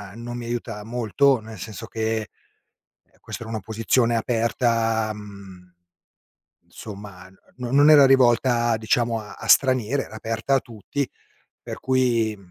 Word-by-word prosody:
non 120 +1 -7
mi 120 - -6
aiuta 115 -3 -5
molto, 120 +3 +1
nel 110 0 -11
senso 110 +4 -7
che, 110 0 -2 0.9
ehm, - - -33
questa - - -8
era 115 - -8
un'opposizione 115 +3 0
aperta, 115 -1 0
mhmm, 100 -4 -12 0.9
insomma, 100 -3 -11 0.3
no 125 -1 -5
non 145 +2 +6
era 145 -3 +8
rivolta, 120 -3 +3
diciamo, 115 +1 0
a 105 -1 -10
a - - -9
stranieri, 130 0 +3
era - - -12
aperta 115 +5 -1
a - - +3
tutti 120 +5 -5 0.6
per - - -8
cui, 120 -4 +1
115 Hz, 135 wpm, -23 LUFS, 110-125 Hz, 0.9 s, era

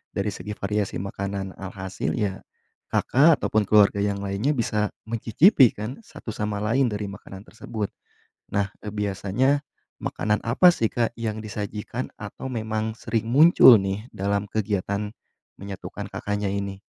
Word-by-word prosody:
dari 105 +1 -1
segi 105 0 -6
variasi 105 0 -1
makanan. 100 0 -4
Alhasil, 95 0 -4
ya, 100 -4 -2 0.5
Kakak 145 +3 +4
ataupun 110 -1 +2
keluarga 105 -1 +5
yang 100 0 -1
lainnya 100 +10 0
bisa 105 -4 0 0.2
mencicipi 120 - +5
kan, 110 - -6
satu 125 - -9
sama 105 -1 -3
lain 125 +4 +2
dari 105 -1 -3
makanan 95 -1 -10
tersebut. 110 -1 -5 0.6
Nah, 100 0 0
eee, 105 - -7
biasanya 105 +7 +1 0.4
makanan 105 0 -1
apa 155 +10 +5
sih, 115 - +1
Kak, 120 -1 0
yang 110 -2 -3
disajikan 105 +4 -5
atau 105 +5 -7
memang 110 -2 -2
sering 115 -1 -2
muncul 145 -2 +8
nih, 95 +4 -3
dalam 100 +1 -1
kegiatan 105 -1 -2 0.5
menyatukan 100 -1 -7
Kakaknya 105 0 -2
ini? 100 0 -3
105 Hz, 140 wpm, -25 LUFS, 100-115 Hz, 0.6 s, muncul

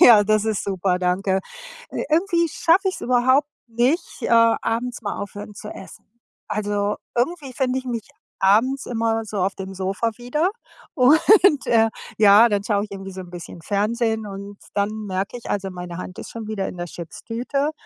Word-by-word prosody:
ja, 225 -10 +8
das 215 0 +2
ist 215 -2 -1
super, 190 -2 0
danke. 190 +1 +1 0.5
Ir - - -3
Irgendwie 340 0 +3
schaffe 370 +6 +3
ich‘s - - -6
überhaupt 260 +4 +3 0.2
nicht, 245 +9 0
äh, - - -1 0.3
abends 240 +2 -2
mal 205 -2 -3
aufhören 205 +1 -7
zu - - -8
essen. 195 - -11 0.5
Also, 205 0 -1 0.2
irgendwie 270 +2 -1
finde 260 0 0
ich 260 - -12
mich 235 -3 -4 0.3
abends 230 +8 +3
immer 225 -1 0
so 210 -1 -5
auf 190 +2 0
dem 190 0 -7
Sofa 195 +5 -1
wieder 300 +9 0 0.5
und, 315 +4 +5
äh, 225 -1 +4 0.3
ja, 215 +2 +7
dann 205 -2 0
schaue 205 -2 +1
ich 210 - -19
irgendwie 195 -1 -7
so 190 0 -7
‘n 180 - -11
bisschen 175 -1 -9
Fernsehen 220 +3 0
und 200 0 -8 0.2
dann 200 0 +1 0.2
merke 195 +4 -3
ich, 240 - -10
also 195 -1 -1
meine 180 -1 -7
Hand 180 0 -7
ist - - -8
schon 225 -2 -7
wieder 205 -3 -2
in - - -6
der 175 - -3
Chips-Tüte 235 - -3
215 Hz, 180 wpm, -22 LUFS, 195-250 Hz, 0.5 s, ja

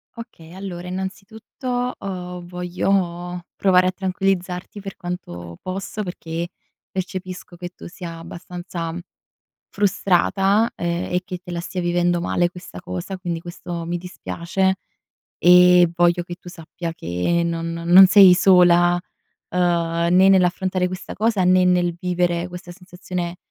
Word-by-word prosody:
Okay, 180 -8 -11
allora 185 -2 -7
innanzitutto, 220 +7 -4
uhm, 180 -2 -6
voglio 180 0 -2
provare 185 -2 +4
a - - +2
tranquillizzarti 185 0 -2
per 195 -1 -8
quanto 85 - -7
posso 195 +3 -5
perché, 170 -1 -5 0.4
percepisco 185 -1 -6
che 175 0 -7
tu 180 - -12
sia 170 -2 -8
abbastanza 170 0 -6 0.8
frustrata, 200 +2 +2
ehm, 175 +1 -2
e 180 - +1
che 180 - -6
te 180 0 -12
la 170 -1 -3
stia 180 +1 -4
vivendo 175 0 +1
male 175 0 +1
questa 175 - -10
cosa, 90 - -5
quindi 175 -2 -4
questo 175 -1 -7
mi 175 +1 -2
dispiace; 180 +1 -2 0.6
ehm, 180 0 +6
voglio 175 0 +2
che 175 0 -7
tu 175 - -18
sappia 170 0 -7
che 90 - -1
non 165 0 -2
non 175 +3 +7
sei 195 -1 +8
sola, 175 -1 +5 0.6
uhm, 170 -1 +1
né 185 +1 +6
nell'affrontare 185 -1 +2
questa 185 0 -7
cosa, 215 -1 +1
né 185 0 +5
nel 175 -1 +2
vivere 175 -1 -1
questa 180 0 -9
sensazione 180 -1 -6
180 Hz, 135 wpm, -21 LUFS, 175-185 Hz, 0.8 s, sei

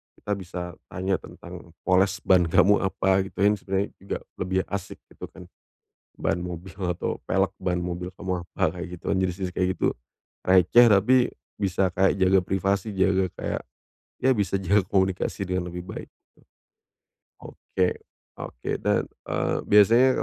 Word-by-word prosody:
kita 105 - -7
bisa 90 -1 -6 0.3
tanya 95 0 -1
tentang 85 0 -12
poles 95 +2 +2
ban 90 -2 +4
kamu 100 +5 +4
apa, 95 0 +1 0.2
yang 105 0 +3
sebenarnya 95 +1 -2
juga 95 - -4 0.2
lebih 95 +1 0
asik 100 0 -4 0.2
gitu - - -9
kan, - - -13 0.7
ban 85 - -1
mobil 90 +1 -7
atau 90 -3 -2
pelek 95 0 +1 0.3
mobil 90 +1 -5
kamu 90 -2 -4
apa, 85 0 -1
kayak 90 +1 -5
gitu. - - -18
Jenis 95 -1 0
jenis 90 -1 -2
kayak 90 - +2
gitu, - - 0 0.6
receh, 95 +6 +6
tapi 105 +4 +5 0.4
bisa 95 -1 +1
kayak 95 +2 +2
jaga 95 +1 +5
privasi, 100 +3 -1
jaga 95 0 +2
kayak, - - -4 0.6
ya, 130 - +3
bisa 100 -1 0
jaga 95 +1 +2
komunikasi 95 0 0
dengan 90 -1 -2
lebih 90 - -5
baik, - - -7 1.1
gitu. - - -20
Oke, 90 -1 -1 0.5
oke, - - -6
dan, - - +1 0.2
eee, - - 0
biasanya 115 +5 +6
95 Hz, 145 wpm, -25 LUFS, 90-100 Hz, 1.1 s, receh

